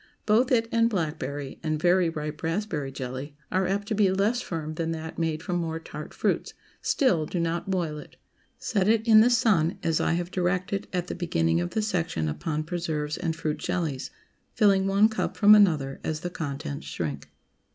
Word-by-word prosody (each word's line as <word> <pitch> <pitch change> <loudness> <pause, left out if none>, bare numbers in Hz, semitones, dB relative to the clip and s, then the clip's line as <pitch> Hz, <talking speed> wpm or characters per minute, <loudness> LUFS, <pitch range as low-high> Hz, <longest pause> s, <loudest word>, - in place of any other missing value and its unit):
Both 230 +5 +3
it 230 -2 +3
and 230 0 +3
blackberry, 150 - -3
and 155 -1 -1
very 175 +1 +3
ripe 150 -1 -5
raspberry 165 -5 -2
jelly, 130 +2 -6 0.2
are 185 0 +1
apt 200 +2 -1
to - - +1
be 205 -3 +3
less 205 +6 +1
firm 155 -3 -4
than 165 +1 -2
that 160 +1 -6
made 160 -1 -1
from 180 -2 -1
more 165 -1 -2
tart 150 -2 -8
fruits; - - -1 0.3
still, 175 - +2
do 180 - -3
not 170 +2 -1
boil 170 -5 -1
it. - - -13 0.4
Set 200 -3 0
it 225 +1 +2
in 215 -1 +8
the 235 - +5
sun, 200 -9 +3
as 165 -2 +1
I - - +1
have 175 +1 -2
directed 185 +2 -1
at 180 -2 -1
the - - -5
beginning 80 - 0
of 85 - -2
the 220 - -1
section 170 - -1
upon 150 - -2
preserves 155 -3 -3
and 160 - -2
fruit 155 -2 -2
jellies, 165 -7 -2 0.5
filling 195 -3 +4
one 200 +2 +5
cup 220 - -3
from 210 0 +8
another 155 -10 +3
as 155 -1 -3
the 175 - -4
contents 145 -2 -5
shrink. 75 -4 -4
170 Hz, 190 wpm, -26 LUFS, 155-195 Hz, 0.5 s, in